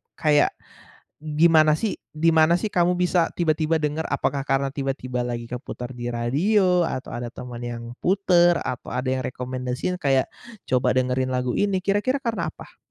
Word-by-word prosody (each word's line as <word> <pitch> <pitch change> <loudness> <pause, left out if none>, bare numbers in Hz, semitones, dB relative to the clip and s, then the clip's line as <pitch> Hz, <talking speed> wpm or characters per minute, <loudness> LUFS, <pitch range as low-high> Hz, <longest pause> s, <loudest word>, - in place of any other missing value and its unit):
kayak 150 -2 +3 0.6
gimana 155 0 +4
sih 210 +6 -2 0.2
di 160 +2 +2
mana 160 +1 +4
sih, 215 - -1
kamu 180 -2 +2
bisa 180 -1 +2
tiba-tiba 160 -1 +1
denger? 150 +2 -1
Apakah 140 -1 -1
karena 135 0 +1
tiba-tiba 130 -3 -3
lagi 120 -1 -4
keputar 125 0 -6
di 120 0 -4
radio 180 - +2
atau 130 - -5
ada 120 0 -4
teman 120 -1 -8
yang 120 -1 -5 0.2
puter 175 -2 +3
atau 125 - -5
ada 130 +1 -1
yang 130 -1 -1
rekomendasiin, 125 +6 -3
kayak 135 -4 +2 0.4
coba 125 0 +2
dengerin 130 0 +1
lagu 125 -1 0
ini, 195 -2 +1
kira-kira 210 +8 +1
karena 230 -2 -1
apa? - - -14
150 Hz, 160 wpm, -24 LUFS, 125-175 Hz, 0.6 s, gimana